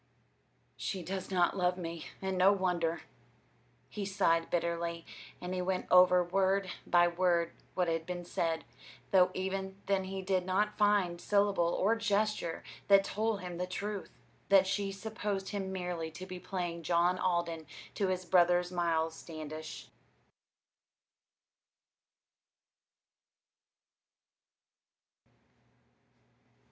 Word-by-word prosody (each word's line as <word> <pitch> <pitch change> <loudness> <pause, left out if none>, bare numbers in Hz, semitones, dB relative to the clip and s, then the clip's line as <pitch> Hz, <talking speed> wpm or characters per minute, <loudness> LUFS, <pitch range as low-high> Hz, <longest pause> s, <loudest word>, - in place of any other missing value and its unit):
"She 185 -2 -3
does 190 +1 -4
not 180 -1 +2
love 180 -1 +1
me, 165 -2 -6 0.2
and 190 0 -1
no 185 +2 +6
wonder," 175 -4 0 0.9
he 210 - -5
sighed 185 -4 +1
bitterly; 170 -1 -2 0.3
and 180 +1 -5
he 185 - -1
went 185 0 -1
over 180 0 +7
word 190 +1 +1 0.2
by 175 0 +5
word 175 -1 +1 0.2
what 180 -1 +1
had 165 -1 -1
been 175 -1 -4
said, 165 -1 -1 0.5
though 185 -1 +6
even 190 +1 -3
then 195 -1 +1
he 190 0 -5
did 185 -1 +1
not 200 +3 0
find 200 -5 +2
syllable 200 -4 +2
or 215 +4 +3
gesture 210 -5 0 0.2
that 195 -1 +7
told 215 +1 -1
him 180 -1 -6
the 180 - -1
truth 200 +2 -4 0.4
that 195 -1 +6
she 195 +1 -1
supposed 200 -1 -4
him 195 -2 -3
merely 180 -3 -3
to 170 +4 -9
be 185 -1 -7
playing 175 -2 -4
John 175 +2 +2
Alden 170 -3 -1 0.3
to 200 - 0
his 185 -1 -2
brother's 175 0 +3
Miles 165 -2 0
Standish. 155 -1 -8
185 Hz, 115 wpm, -32 LUFS, 170-195 Hz, 0.9 s, over